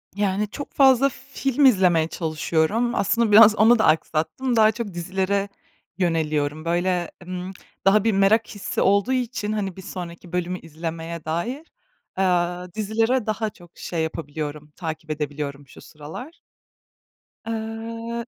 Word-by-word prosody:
Yani 205 +1 0
çok 285 - -8
fazla 270 -1 +5
film 275 +1 -1
izlemeye 180 -9 +4
çalışıyorum. 165 +8 0
Aslında 230 +2 +1
biraz 215 +1 +9
onu 225 +2 +5
da 220 - +3
aksattım. 160 +11 +1
Daha 220 -1 +6
çok 215 -3 -5
dizilere 190 +3 -1 0.5
yöneliyorum. 155 -3 0
Böyle, 175 +1 0
ımm, 180 +1 -5 0.3
daha 195 +1 +5
bir 225 - +3
merak 210 +3 +3
hissi 205 -3 -4
olduğu 200 +6 +3
için, 240 -4 -2
hani 200 -4 -2
bir 190 - -9
sonraki 175 -2 -8
bölümü 180 0 -2
izlemeye 165 +1 -6
dair, 235 - -3 0.5
aaa, 180 -1 0
dizilere 225 +4 0
daha 215 0 -1
çok 175 -4 -19
şey 165 -2 -3
yapabiliyorum, 150 -1 -5
takip 160 -2 -5
edebiliyorum 145 -2 -4
şu - - -14
sıralar. 160 - -10 1.1
Iıı 230 +1 -4
190 Hz, 130 wpm, -23 LUFS, 165-225 Hz, 1.1 s, biraz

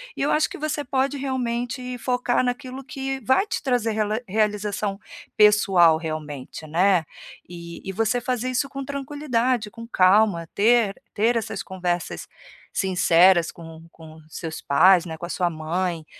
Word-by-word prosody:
e - - -5
eu 280 - +1
acho 305 - +2
que - - -8
você 305 -1 -2
pode 270 +2 0
realmente 250 -1 -3
focar 250 0 0
naquilo 255 +1 -4
que 270 0 -4
vai 260 - +3
te - - -3
trazer 245 -5 0
rela 215 +1 -1
realização 210 -1 -1 0.4
pessoal 195 -6 +5
realmente, 155 -2 -6
né. 175 +2 +3 0.4
E 170 -1 -9
e - - -2
você 225 +4 0
fazer 250 0 -2
isso 255 +2 -1
com 275 0 -6
tranquilidade, 260 -5 -1
com 230 +1 -10
calma, 185 -4 +3
ter 220 -1 +3 0.2
ter 230 +4 +2
essas 225 -2 -3
conversas 180 -2 -3 0.5
sinceras 180 -2 +4
com 165 -1 -12
com 160 -1 -14
seus 160 0 -6
pais, 180 +5 +5
né, 160 -2 -6
com 170 - -6
a - - -9
sua 180 -1 0
mãe, 165 +1 -3
210 Hz, 150 wpm, -23 LUFS, 175-250 Hz, 0.5 s, pessoal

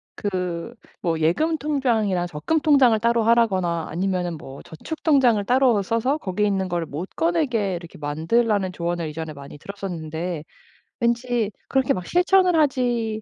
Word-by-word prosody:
그 180 +1 -3 0.3
뭐 165 -2 -1
예금 310 - +2
통장이랑 230 -11 0
적금 175 - -1
통장을 275 -7 +5
따로 235 0 +2
하라거나 190 -8 +2
아니면은 180 0 -2
뭐 135 -2 -10
저축 315 - -8
통장을 255 -9 +4
따로 250 -4 +3
써서 230 +8 0
거기에 210 -6 -1
있는 195 -2 0
거를 175 -2 -2
못 155 +6 -5
꺼내게 265 - 0
이렇게 170 -1 -9
만들라는 185 +7 0
조언을 170 -1 -2
이전에 160 +1 -6
많이 140 0 -11
들었었는데 175 -3 -5 0.6
왠지 235 -2 0 0.2
그렇게 265 -2 +2
막 180 -1 -5
실천을 360 0 +3
하지 240 -6 0
205 Hz, 340 characters per minute, -23 LUFS, 170-245 Hz, 0.6 s, 통장을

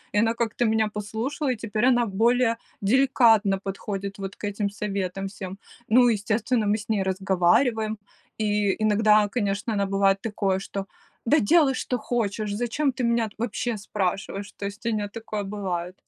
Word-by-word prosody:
И - - +4
она 225 +1 +3
как-то 235 +1 0
меня 220 -1 +2
послушала, 230 +7 -2
и - - -5
теперь 220 +1 -1
она 245 -2 +4
более 230 +3 +2 0.2
деликатно 225 -4 +4
подходит 195 0 -5
вот 195 0 -5
к - - -7
этим 205 0 -2
советам 195 -2 -3
всем. 190 -1 -7 0.3
Ну, 245 +2 +6
естественно, 220 +2 0
мы 205 +1 +2
с 220 +2 -10
ней 210 -3 +1
разговариваем. 190 +4 +1 0.4
И 210 -2 +1
иногда, 215 0 +4
конечно, 205 0 -1
она, 200 -1 +1
бывает, 195 0 +2
такое, 195 -4 -1
что: 195 0 -5 0.4
"Да 295 +6 +4
делай, 290 +4 +4
что 250 - -2
хочешь, 215 -3 -2
зачем 240 +6 0
ты 255 - -3
меня 235 -1 +1
вообще 235 0 -2
спрашиваешь!". 195 0 -3
То 200 - -7
есть 205 +3 -7
у 230 - +1
нее 210 -2 -1
такое 215 -1 -5
бывает. 185 -3 -4
210 Hz, 165 wpm, -25 LUFS, 200-230 Hz, 0.4 s, Ну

